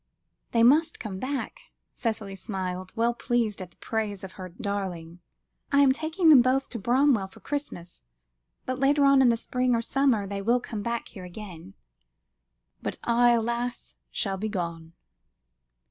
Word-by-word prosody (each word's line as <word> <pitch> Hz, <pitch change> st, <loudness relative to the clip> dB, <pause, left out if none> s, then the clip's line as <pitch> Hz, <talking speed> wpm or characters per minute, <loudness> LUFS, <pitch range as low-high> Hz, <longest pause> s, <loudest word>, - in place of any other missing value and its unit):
"They 230 Hz, -1 st, +3 dB
must 315 Hz, +7 st, +4 dB
come 195 Hz, -4 st, -5 dB
back," 265 Hz, +3 st, -4 dB, 0.3 s
Cicely 220 Hz, -4 st, -3 dB
smiled, 185 Hz, -2 st, -5 dB
well 235 Hz, +1 st, +2 dB
pleased 235 Hz, -4 st, -1 dB
at 185 Hz, -, -7 dB
the -, -, -29 dB
praise 210 Hz, -4 st, -3 dB
of 190 Hz, -, -7 dB
her 185 Hz, -1 st, -8 dB
darling. 180 Hz, -3 st, -5 dB, 0.5 s
"I 280 Hz, 0 st, +5 dB
am 275 Hz, -2 st, +6 dB
taking 320 Hz, +4 st, +1 dB
them 285 Hz, -5 st, +9 dB
both 260 Hz, +2 st, +1 dB
to 235 Hz, -, -5 dB
Bramwell 240 Hz, -1 st, +3 dB
for 190 Hz, -, -17 dB
Christmas, 230 Hz, -, -6 dB, 0.6 s
but 255 Hz, 0 st, -3 dB
later 280 Hz, +1 st, +4 dB
on 275 Hz, -1 st, +6 dB
in 255 Hz, -, +6 dB
the 230 Hz, -, +2 dB
spring 250 Hz, +1 st, 0 dB
or 230 Hz, -, +1 dB
summer, 255 Hz, -5 st, +2 dB
they 200 Hz, 0 st, -4 dB
will 235 Hz, +5 st, +2 dB
come 220 Hz, -4 st, -6 dB, 0.2 s
here 190 Hz, -, -11 dB
again." 175 Hz, -, -10 dB, 1.1 s
"But -, -, -4 dB
I, 240 Hz, +1 st, +4 dB
alas! 235 Hz, +1 st, -2 dB, 0.2 s
shall 195 Hz, -2 st, -2 dB
be 215 Hz, +3 st, -3 dB
gone." 170 Hz, -4 st, -4 dB
230 Hz, 160 wpm, -27 LUFS, 190-255 Hz, 1.1 s, them